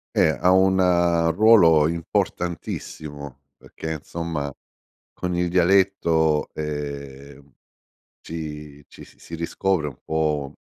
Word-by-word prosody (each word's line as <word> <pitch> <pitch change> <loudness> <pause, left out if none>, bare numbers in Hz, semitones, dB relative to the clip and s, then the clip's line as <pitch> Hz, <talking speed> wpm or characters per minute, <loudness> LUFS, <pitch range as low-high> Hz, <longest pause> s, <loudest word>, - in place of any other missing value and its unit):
Eh, - - +4
ha 90 - +3
un 95 0 +4 0.6
ruolo 90 -9 +6
importantissimo 80 -4 -4 0.2
perché, 80 - -8
insomma, 80 -2 -5 0.6
con 90 -1 -3
il 90 0 0
dialetto, 85 -4 +2
ehm, 70 -2 -7 0.7
ci 75 -3 -8
ci - - -14
si - - -21
si 85 - -9
riscopre 85 0 -1
un 70 -2 -8
po' 75 -3 -1
80 Hz, 100 wpm, -23 LUFS, 75-90 Hz, 0.7 s, ruolo